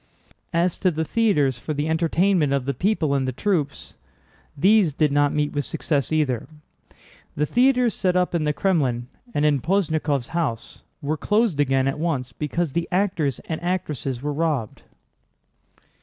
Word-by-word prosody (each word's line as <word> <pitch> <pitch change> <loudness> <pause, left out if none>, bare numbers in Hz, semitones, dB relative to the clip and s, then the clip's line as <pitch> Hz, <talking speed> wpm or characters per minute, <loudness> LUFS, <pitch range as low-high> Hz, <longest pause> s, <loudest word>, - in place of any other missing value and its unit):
As 170 0 0
to 185 - +3
the 160 -1 -2
theaters 150 - +1
for 155 +4 -4
the 145 +2 -1
entertainment 165 -1 +2
of 140 -2 0
the 140 - -1
people 165 - 0
and 135 -2 0
the - - 0
troops, 160 - -2 0.6
these 190 0 +4
did 150 0 +1
not 145 0 +3
meet 150 -1 -1
with 145 - -1
success 145 -1 -2
either. 145 -7 0 0.9
The 150 - +1
theaters 250 - +3
set 180 -1 0
up 180 -1 +1
in 170 -2 0
the 150 - +1
Krémlin 145 -9 0 0.3
and 145 - +2
in 145 -3 +2
Posnyákov's 155 -7 0
house 150 -10 -3 0.2
were 155 +2 -1
closed 210 -3 +1
again 135 -2 +2
at 135 - -2
once 135 -7 -2
because 155 +2 -2
the 170 +3 -1
actors 180 -8 0
and 160 -1 -4
actresses 150 -8 -3
were 150 0 -1
robbed. 145 -8 -2
155 Hz, 160 wpm, -23 LUFS, 140-180 Hz, 0.9 s, these